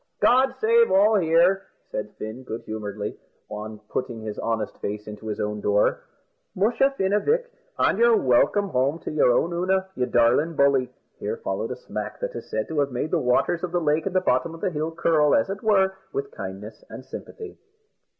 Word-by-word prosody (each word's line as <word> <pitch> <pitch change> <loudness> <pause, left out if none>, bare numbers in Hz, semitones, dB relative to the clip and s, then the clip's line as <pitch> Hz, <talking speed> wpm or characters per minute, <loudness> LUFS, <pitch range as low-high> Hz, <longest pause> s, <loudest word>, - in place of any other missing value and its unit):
"God 260 +2 +4
save 465 +1 +4
all 205 +3 +5
here!" 175 +3 +3 0.2
said 105 0 -4
Fin, 110 +4 -6
good 115 -2 -6
humouredly, 105 -1 -5 0.3
on 105 0 -7
putting 125 -3 -3
his 110 -1 -6
honest 110 -2 -2
face 105 +1 -4
into 105 +1 -8
his 105 - -3
own 105 0 -2
door. 105 0 +1 0.5
"Musha, 230 +8 +3
Fin, 190 +1 +1
avick, 460 - +2 0.3
an' 195 - +2
you're 235 -1 +5
welcome 165 +11 +2
home 135 +3 +1
to - - -5
your 150 -5 +4
own 165 +8 +1
Oonagh, 190 +2 0
you 125 -1 0
darlin' 125 +8 +3
bully." 140 -3 +3 0.3
Here 460 - -3
followed 460 - -3
a - - -4
smack - - -6
that - - -4
is - - -8
said 110 0 -2
to 160 -2 -1
have 140 -1 +1
made 125 +5 -3
the - - +2
waters 125 +7 +1
of 180 - -2
the 175 - +1
lake 155 +1 +1
at 190 - -3
the 185 - +3
bottom 160 +1 0
of 165 - -13
the 195 - 0
hill 155 0 -2
curl, 160 -3 +3
as 115 - +1
it 200 - -5
were, 195 -3 +3 0.2
with 140 0 -4
kindness 100 +2 -8
and 130 - -9
sympathy. 420 - -9
150 Hz, 200 wpm, -24 LUFS, -, 0.5 s, all